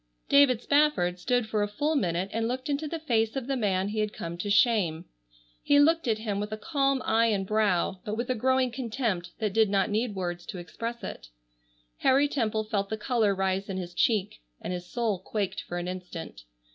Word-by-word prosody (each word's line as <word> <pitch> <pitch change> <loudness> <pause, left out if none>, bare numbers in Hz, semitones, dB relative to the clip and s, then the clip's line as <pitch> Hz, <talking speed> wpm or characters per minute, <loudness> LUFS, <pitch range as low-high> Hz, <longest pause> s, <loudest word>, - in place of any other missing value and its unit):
David 275 -4 +5
Spafford 285 -12 +2
stood 245 +4 +1
for 215 -1 0
a 205 - +1
full 295 +9 -1
minute 185 - 0
and 225 0 0
looked 255 +4 -3
into 290 +2 -1
the 330 - -3
face 230 -7 0
of 265 -3 -2
the 270 +1 -1
man 195 -5 0
he 215 +1 -3
had 210 -1 -1
come 170 0 -5
to 205 - -3
shame. 200 -6 +3 0.6
He 285 - +4
looked 325 0 +4
at 220 -2 +2
him 210 -2 -3
with 210 +1 -4
a 215 - -3
calm 275 0 0
eye 230 +1 +3
and 200 -3 0
brow, 195 -3 +1
but 215 +1 -4
with 240 +1 -2
a 255 - +1
growing 255 +1 +2
contempt 230 -8 -2
that 210 -3 -2
did 220 -1 +4
not 195 0 +1
need 215 0 0
words 175 -2 -4
to - - -6
express 230 +7 -6
it. - - -7 0.7
Harry 275 +2 +4
Temple 220 -6 -1
felt 200 -2 -2
the 220 - -2
color 215 -3 +1
rise 190 +1 -1
in 190 - -3
his 175 -1 -5
cheek, 205 - +1 0.2
and - - -4
his 175 0 -6
soul 225 -3 -1
quaked 195 0 -3
for 175 - -6
an 175 0 -3
instant. 180 - -7
215 Hz, 210 wpm, -28 LUFS, 190-250 Hz, 0.7 s, David